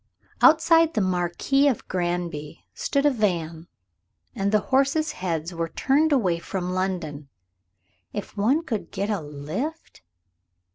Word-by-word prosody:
Outside 325 0 +5
the - - +2
"Marquis 185 +10 +1
of 260 -6 -1
Granby" 175 -4 -3
stood 280 +1 0
a 290 - +5
van, 170 - -1 0.7
and 200 0 -1
the 215 - +4
horses' 280 +4 +3
heads 170 - -3
were 165 -1 -3
turned 295 - +2
away 190 -12 +2
from 180 +1 -4
London. 175 -7 -3 0.8
If 205 - -6
one 250 +11 +2
could 230 -10 -4
get 200 +2 -2
a 200 -4 -1
lift? 155 - -6
190 Hz, 130 wpm, -25 LUFS, 170-275 Hz, 0.8 s, Outside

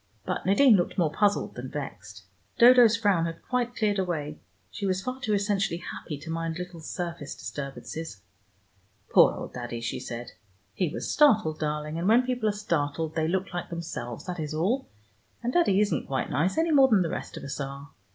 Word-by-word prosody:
But - - -3
Nadine 235 +4 +6
looked 175 -3 0
more 165 -5 +2
puzzled 205 +5 +1
than 125 +1 -7
vexed. 130 -8 -7 0.3
Dodo's 240 -2 +7
frown 200 -7 +2
had 165 - -7
quite 245 -1 -1
cleared 205 -2 +1
away. 155 -5 -3 0.3
She 200 -2 -3
was 185 0 -1
far 255 +1 -4
too 215 -6 +1
essentially 200 -3 0
happy 160 -3 -7
to 160 +1 -6
mind 165 0 -2
little 180 -1 -7
surface 170 -2 -5
disturbances. 140 -4 -7 0.9
"Poor - - +7
old - - -7
Daddy," 120 -1 -5
she 115 - -3
said. 120 0 -6 0.4
"He 180 - 0
was - - -4
startled, 215 - +4
darling, 150 +1 -2
and 175 - -1
when 235 +4 +5
people 245 -4 0
are - - +2
startled 160 -6 -2
they 160 -1 0
look 190 +2 -1
like 175 - -4
themselves, 160 -9 -6
that 180 -2 -5
is 155 0 -3
all, 215 +12 0 0.5
and 245 +2 -1
Daddy 270 - +4
isn't 210 -1 +1
quite 135 -1 -2
nice, 175 - +1
any 325 +1 +2
more 275 -3 +7
than 210 -7 +4
the 165 - -2
rest - - -5
of - - -8
us 140 +2 -5
are. 140 +1 -6
175 Hz, 190 wpm, -27 LUFS, 150-210 Hz, 0.9 s, Dodo's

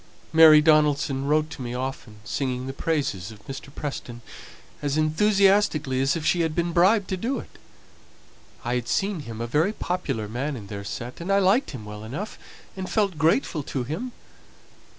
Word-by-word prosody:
Mary 160 -1 +9
Donaldson 150 -3 +3
wrote 155 +2 +1
to - - -8
me 120 0 -4
often, 125 -4 -5
singing 130 +3 -2
the 135 - -5
praises 135 - -2
of 105 -2 -15
Mr. 135 0 -8
Preston 120 -5 -6 0.6
as 145 0 -1
enthusiastically 190 -4 +3
as 135 +3 +2
if 160 -2 -4
she 175 - +3
had 160 -2 -1
been 170 0 0
bribed 190 +4 +4
to 190 - 0
do 245 +8 -1
it. - - -10 1.1
I 120 - 0
had 125 -2 -2
seen 195 -2 0
him 115 -6 -7
a 115 - -2
very 155 - +1
popular 145 - -3
man 135 +7 -3
in 110 -5 -8
their 100 0 -7
set, 120 +8 -6
and 180 +4 -2
I 195 - +5
liked 200 +7 +3
him 120 -7 -8
well 105 0 -8
enough, 150 - -6 0.4
and 190 -1 -5
felt 200 -7 0
grateful 160 - +2
to 135 -2 -3
him. 165 - -4
150 Hz, 180 wpm, -25 LUFS, 125-175 Hz, 1.1 s, Mary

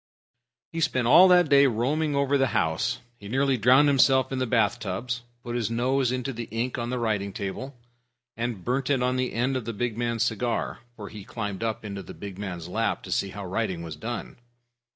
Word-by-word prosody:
He 165 - -4
spent 130 -5 +1
all 180 +9 +8
that 180 -2 +6
day 140 -1 +6
roaming 140 +6 0
over 140 0 +2
the 135 -1 +3
house. 80 0 0 0.2
He 100 - -10
nearly 135 +4 +2
drowned 130 +5 +5
himself 130 -1 +4
in 135 - -2
the 130 - 0
bath 115 0 +2
tubs, 120 +5 -3 0.2
put 120 -1 -4
his 115 -3 -1
nose 125 +2 +1
into 130 +1 -2
the 115 0 -5
ink 115 +4 -3
on 120 +1 -3
a 125 - -1
writing 105 -4 -1
table, 115 +8 -5 0.6
and 115 -5 -4
burned 130 +2 0
it 135 -3 +2
on 125 0 +1
the 130 0 -1
end 125 +4 0
of 125 -4 -3
the 115 - -3
big 115 +1 -2
man's 115 -1 0
cigar, 120 0 -1 0.2
for 105 -3 -8
he 105 -2 -9
climbed 105 -3 -5
up 110 -1 -2
in 100 - -5
the 100 -2 -8
big 100 -2 -8
man's 90 -5 -5
lap 110 +5 -1
to - - -8
see 100 - 0
how 100 0 -7
writing 95 -3 -2
was 80 -3 -6
done. 115 +10 -6
120 Hz, 215 wpm, -26 LUFS, 105-130 Hz, 0.6 s, all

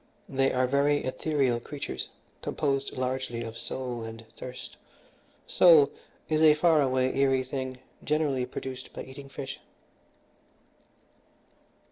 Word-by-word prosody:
They 135 0 +2
are 130 0 +2
very 140 +2 +2
ethereal 130 -2 +1
creatures, 140 +4 -5 0.3
composed 140 -3 -1
largely 130 -2 -2
of 115 0 -7
soul 125 0 -4
and 115 0 -8
thirst. 125 0 -8 0.7
Soul 155 -5 +6 0.4
is 155 0 +1
a 155 -1 +7
far 160 -1 +4
away, 130 -1 +1
eerie 135 -1 +3
thing, 130 0 -4 0.3
generally 145 -5 +1
produced 130 0 -7
by - - -6
eating 135 +1 -11
fish." 135 -1 -6
135 Hz, 115 wpm, -28 LUFS, 130-145 Hz, 0.7 s, a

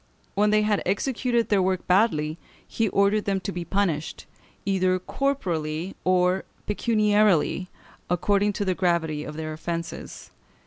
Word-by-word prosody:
When 210 +1 +3
they 215 0 +3
had 210 -1 +1
executed 235 +4 0
their 205 -2 +3
work 185 0 0
badly, 170 -5 +2 0.3
he 225 -2 0
ordered 200 +2 +2
them 195 -1 0
to 185 - -3
be 175 -2 -4
punished, 170 -5 -1 0.4
either 185 -2 +2
corporally 180 - -2
or 185 0 +2 0.2
pecuniarily, 210 -5 +2 0.4
according 200 +4 +2
to 205 - -2
the 185 - +1
gravity 170 -5 0
of 150 0 -7
their 155 -1 -4
offences. 170 +1 -6
190 Hz, 135 wpm, -25 LUFS, 170-210 Hz, 0.4 s, When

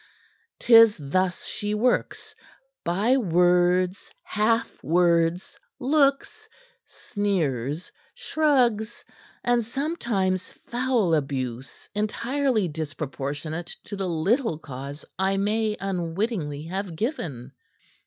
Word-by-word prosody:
'Tis 230 -2 +7
thus 180 +5 -1
she 210 0 -3
works: 245 +4 0 0.5
by 205 +10 +2
words, 180 -2 +2
half 225 +2 0
words, 170 +2 +2 0.2
looks, 275 +1 +1 0.4
sneers, 160 - -2 0.2
shrugs, 245 -8 +1 0.4
and 245 -1 +2
sometimes 230 - -1 0.2
foul 240 -7 +1
abuse 130 -4 -3
entirely 230 +1 0
disproportionate 155 +1 -5
to 205 - -7
the 195 -2 -2
little 185 - +1
cause 140 -1 -8
I 190 +1 +1
may 210 +2 0
unwittingly 175 -4 -2
have 185 +1 -4
given." 155 - -4
190 Hz, 85 wpm, -25 LUFS, 160-230 Hz, 0.5 s, Tis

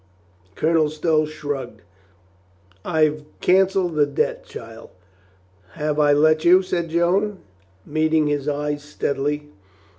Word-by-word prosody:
Colonel 160 -1 +2
Stow 155 0 +1
shrugged. 140 -7 -6 1.0
"I've 155 -1 +1 0.2
canceled 190 -1 +2
that 145 -1 +1
debt, - - -1
child." 115 -1 -11 0.8
"Have 150 -1 -2
I 145 -1 +4
let 155 +2 +3
you?" 180 +2 +6
said 170 -2 -2
Joan, 185 +5 +1 0.5
meeting 155 0 +1
his 145 -1 -1
eyes 145 0 -2
steadily. 145 0 -3
155 Hz, 110 wpm, -22 LUFS, 145-165 Hz, 1.0 s, you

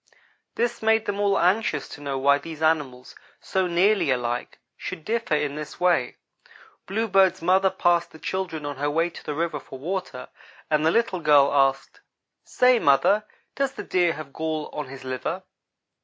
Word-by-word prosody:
This 240 +1 -1
made 220 0 +2
them 205 0 -3
all 200 -1 +2
anxious 185 +6 +1
to 145 - -10
know 140 -2 -3
why 140 +2 +3
these 160 +1 -8
animals, 140 -6 -1 0.2
so 190 -2 -1
nearly 185 +1 +2
alike, 120 -1 -2 0.2
should 155 - -7
differ 230 -7 0
in 150 -1 -1
this 150 0 -7
way. 175 -9 +1 0.7
Bluebird's 195 -4 +2
mother 190 +2 +4
passed 175 -1 +1
the - - -14
children 160 0 -4
on 145 -2 -5
her 145 +2 -1
way 165 +3 0
to - - -11
the 150 - -4
river 165 -1 -2
for 135 - -11
water, 175 -3 -5 0.4
and 155 0 +2
the 160 - +4
little 195 -1 +1
girl 145 -3 +4
asked: 135 -1 +1 0.4
"Say, 250 -1 +3
mother, 145 +9 +3 0.3
does 275 -1 -1
the - - -7
Deer 175 -2 +1
have 150 -3 -9
gall 155 -1 -3
on 150 -2 -5
his 135 0 -10
liver?" 130 -1 -4
160 Hz, 170 wpm, -24 LUFS, 140-190 Hz, 0.7 s, mother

